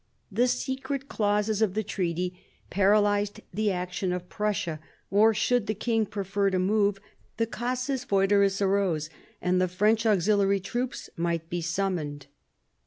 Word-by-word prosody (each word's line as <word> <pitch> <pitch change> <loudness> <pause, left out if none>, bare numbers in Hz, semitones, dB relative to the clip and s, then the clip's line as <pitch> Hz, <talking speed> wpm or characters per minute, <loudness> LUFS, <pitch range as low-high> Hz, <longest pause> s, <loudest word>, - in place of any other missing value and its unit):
The 240 +5 +2
secret 265 +2 -2
clauses 210 0 +1
of 205 -3 +2
the 215 - 0
treaty 180 -3 -2 0.4
paralysed 205 +2 +2
the 210 +2 +1
action 180 0 -2
of 180 0 -4
Prussia; 200 -7 -2 0.3
or, 210 +3 +6
should 225 +1 +1
the 215 - -1
king 225 0 0
prefer 200 -1 -1
to 190 - 0
move, 200 +1 +2 0.4
the 230 - +2
casus 255 +3 -2
foederis 200 -1 +3
arose, 190 -6 +1 0.3
and 180 0 +2
the 185 - +3
French 215 +5 +2
auxiliary 200 0 +3
troops 245 +7 -4
might 165 -1 -2
be 175 0 -1
summoned. 165 -5 -2
200 Hz, 140 wpm, -27 LUFS, 180-215 Hz, 0.4 s, or